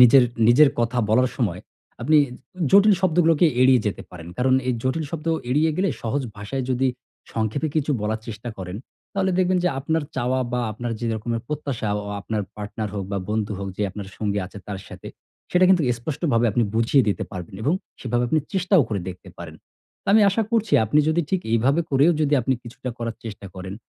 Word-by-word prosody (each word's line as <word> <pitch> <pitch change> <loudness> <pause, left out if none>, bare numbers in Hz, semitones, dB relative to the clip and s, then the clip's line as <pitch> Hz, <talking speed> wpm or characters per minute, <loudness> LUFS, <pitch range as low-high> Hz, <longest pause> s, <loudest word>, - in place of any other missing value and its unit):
নিজের 125 +1 +8 0.2
নিজের 140 +4 +7
কথা 120 +1 0
বলার 125 +4 +4
সময়, 100 -9 -1 0.4
আপনি 150 +5 +5
উ - - -8 0.4
জটিল 200 +1 +7
শব্দগুলোকে 170 -2 +4
এড়িয়ে 130 -2 +6
যেতে 100 - -2
পারেন। 85 -2 -10
কারণ 130 +1 +3
এই - - +3
জটিল 135 +5 -1
শব্দ 165 -1 -6 0.2
এড়িয়ে 155 +5 +3
গেলে 195 +1 +1
সহজ 135 +5 -1
ভাষায় 125 +6 -4
যদি 130 +1 +2 0.4
সংক্ষেপে 115 +8 -1
কিছু 150 -1 +1
বলার 110 +1 -2
চেষ্টা 110 +2 -6
করেন, 90 0 -6 0.4
তাহলে 190 -1 +1
দেখবেন 185 0 +3
যে 180 - +4
আপনার 160 +4 0
চাওয়া 130 +2 0
বা 125 - 0
আপনার 120 +2 -4
যেরকমের 115 0 -2
প্রত্যাশা 140 -7 -3 0.2
ও - - -6
আপনার 105 +1 -2
পার্টনার 105 +1 -4
হোক 100 -2 -3
বা 100 - 0
বন্ধু 110 -1 -1
হোক 100 0 -4
যে - - -1
আপনার 100 0 -7
সঙ্গী 105 -1 -1
আছে 100 - -11
তার 100 - -4
সাথে, - - -9 0.4
সেটা 180 +1 +4
কিন্তু 185 -3 +5 0.2
স্পষ্টভাবে 135 -3 0
আপনি 120 - +2
বুঝিয়ে 115 +4 +4
দিতে 100 - -1
পারবেন 90 0 -7
এবং 145 +7 +2 0.3
সেভাবে 120 0 0
আপনি 155 - +2
চেষ্টাও 190 -2 +3
করে 105 -3 -2
দেখতে 90 +1 -9
পারেন। 80 -2 -8 0.5
তো - - -54
আমি 220 - +7
আশা 225 +3 +1
করছি 225 -1 +1
আপনি 145 +8 +3
যদি 160 +2 +2
ঠিক 190 - +1
এইভাবে 130 +8 +3
করেও 140 +5 +5
যদি 150 -1 +3
আপনি 135 - +1
কিছুটা 125 +2 -7
করার 115 -1 -4
চেষ্টা 105 -2 -7
করেন 95 +1 -7
125 Hz, 195 wpm, -23 LUFS, 110-155 Hz, 0.5 s, নিজের